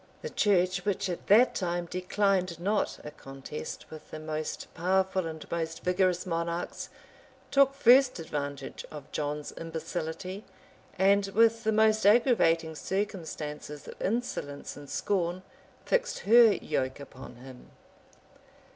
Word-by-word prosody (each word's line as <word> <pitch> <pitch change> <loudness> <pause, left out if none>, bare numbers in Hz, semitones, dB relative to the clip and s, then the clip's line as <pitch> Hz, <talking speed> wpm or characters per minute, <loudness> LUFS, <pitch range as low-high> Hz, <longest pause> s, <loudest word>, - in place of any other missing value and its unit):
The 475 - -5
church, 185 -2 +2
which 200 -1 -1
at 175 - -5
that 230 +5 +6
time 175 -2 -2
declined 185 0 0
not 205 +4 0
a 150 - -6
contest 135 +1 -8
with 155 -1 -11
the - - -7
most 155 0 -4
powerful 185 +1 +1
and 160 -1 -7
most 165 -1 -3
vigorous 180 0 +1
monarchs, 170 0 -3 0.6
took 275 -1 +4
first 255 0 +5
advantage 145 -4 -5
of 150 -3 -10
John's 150 0 -3
imbecility; 165 +3 -5 0.5
and, 195 +1 +4
with 230 +3 +3
the 220 - +2
most 220 0 +3
aggravating 205 -9 +4
circumstances 160 -6 -4
of - - -10
insolence 190 -10 -3
and 145 -1 -11
scorn, 180 -2 -1 0.4
fixed - - 0
her 230 +1 +7
yoke 130 -8 -2
upon 130 -3 -11
him. 125 +1 -13
180 Hz, 125 wpm, -29 LUFS, 155-205 Hz, 0.6 s, her